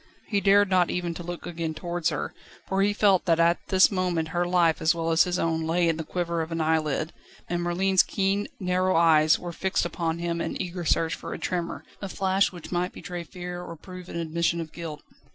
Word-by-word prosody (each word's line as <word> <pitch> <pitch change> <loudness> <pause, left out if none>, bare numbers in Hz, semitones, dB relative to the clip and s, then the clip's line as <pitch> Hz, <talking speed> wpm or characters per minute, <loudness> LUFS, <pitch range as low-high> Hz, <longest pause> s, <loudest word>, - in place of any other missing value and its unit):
He 200 -2 +1
dared 200 +1 +5
not 185 -2 +3
even 175 -1 -2
to 170 - -7
look 175 0 -6
again 165 -2 -4
towards 175 +1 -1
her, - - -3 0.3
for 190 0 +1
he 205 +1 +3
felt 205 -3 +3
that 165 -2 +3
at 170 +1 +4
this 190 +1 +5
moment 180 -4 0
her 175 +1 0
life 175 -3 +3
as 160 +2 +3
well 165 0 -1
as 160 0 +5
his 180 0 -1
own 160 -1 0
lay 170 +1 +2
in 165 -1 +1
the 160 - -3
quiver 170 0 -2
of 160 +1 -5
an 165 - -2
eyelid; 155 0 0 0.3
and 175 0 -1
Merlin's 185 +2 +3
keen, 195 +1 0
narrow 185 0 +1
eyes 160 -2 +5
were 175 - -6
fixed 190 +3 0
upon 165 -2 -2
him 170 0 -2
in - - -3
eager 180 -2 -4
search 165 +1 +2
for - - -6
a - - -5
tremor, 175 -2 -3 0.2
a 195 - -4
flash, 190 +1 +1
which 175 -4 -10
might 180 0 -1
betray 175 -1 -6
fear 175 0 -7
or 170 -1 -8
prove 180 +2 -11
an - - -7
admission 170 +1 0
of 160 -2 -5
guilt. 160 -3 -7
175 Hz, 225 wpm, -26 LUFS, 165-185 Hz, 0.3 s, dared